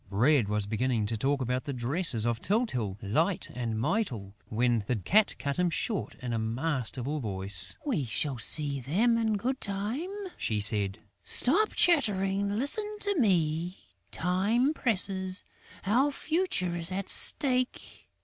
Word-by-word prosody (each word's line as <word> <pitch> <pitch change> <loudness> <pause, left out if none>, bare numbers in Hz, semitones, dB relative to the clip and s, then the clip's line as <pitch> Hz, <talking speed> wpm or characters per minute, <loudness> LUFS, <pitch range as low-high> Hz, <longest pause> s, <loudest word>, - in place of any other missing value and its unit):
Bread 115 +3 +2
was 105 -1 0
beginning 115 +1 -1
to 115 +2 -2
talk 135 +5 0
about 125 +1 -2
the 140 - -4
dresses 125 -1 +1
of 115 -1 -1
Tyltyl, 125 - -1
Light 165 - 0
and 115 -3 -3
Mytyl, 115 - -2 0.2
when 120 0 +1
the 125 - 0
Cat 200 - +2
cut 140 0 -3
him 180 -1 +2
short 200 +4 -2
in 120 -1 -3
a 115 - -1
masterful 130 +3 -2
voice: 95 -4 -1
"We 220 - -1
shall 130 +2 -2
see 140 +4 0
them 195 - +1
in 220 -2 0
good 260 +6 -3
time," 210 - -3 0.3
she 110 -2 -1
said. 100 -1 +4 0.3
"Stop 400 - +2
chattering, 200 - +2
listen 415 - +2
to 405 -4 0
me, 175 - +1 0.3
time 205 - +1
presses: 190 -7 +1 0.4
our 255 +9 +2
future 310 - -1
is 170 +1 -1
at 190 +1 -3
stake...." 255 -3 0
165 Hz, 145 wpm, -28 LUFS, -, 0.4 s, said